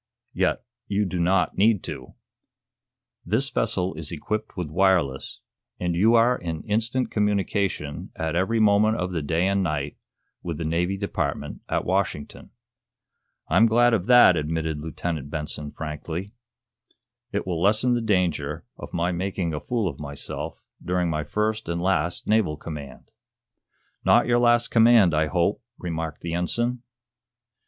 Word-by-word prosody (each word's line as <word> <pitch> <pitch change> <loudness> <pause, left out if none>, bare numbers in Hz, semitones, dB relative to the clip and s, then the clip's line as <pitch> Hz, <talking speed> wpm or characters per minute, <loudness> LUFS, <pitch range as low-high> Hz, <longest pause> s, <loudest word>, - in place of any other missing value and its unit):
"Yet - - 0 0.2
you 105 0 +1
do 90 -1 -3
not 90 +2 +1
need 105 -1 +4
to. 65 -1 -7 1.1
This 120 +9 0
vessel 95 -4 0
is 80 -2 -6
equipped 105 +7 -4
with 85 -5 -4
wireless, 85 -7 +1 0.4
and 90 -1 -1
you 110 +7 +4
are 120 +2 +5
in 80 -7 -5
instant 115 +4 -1
communication, 100 -7 -1
at 80 0 -2
every 95 +6 +1
moment 110 +1 +4
of 90 0 -2
the 85 -3 -2
day 80 +5 +1
and 100 0 +1
night, 75 -5 -2 0.4
with 85 -3 -4
the 80 - -4
Navy 90 +4 0
Department 100 0 -3
at - - 0
Washington." 95 -6 -2 1.0
"I'm 115 - +5
glad 120 +2 +4
of 100 -4 0
that," 120 -7 +7
admitted 80 0 -2
Lieutenant 80 -2 -4
Benson, 75 -1 -4
frankly. 80 +5 -5 1.0
"It - - -2
will 85 -3 -2
lessen 110 +6 +3
the 120 - +1
danger 90 -9 0
of - - -8
my 85 +1 +1
making 90 -1 -2
a 75 - -2
fool 115 0 -1
of - - -5
myself 70 -1 -5 0.2
during 90 -1 0
my 75 -1 -1
first 105 +5 -2
and 85 0 -1
last 90 -1 0
naval 105 -8 +2
command." 75 -4 -9 0.9
"Not - - +5
your 120 0 +3
last 120 0 +4
command, 115 -6 +6
I 75 0 +2
hope," 90 +4 0 0.2
remarked 80 -3 -4
the 85 -1 -4
ensign. 120 +8 -1
90 Hz, 145 wpm, -25 LUFS, 80-105 Hz, 1.1 s, that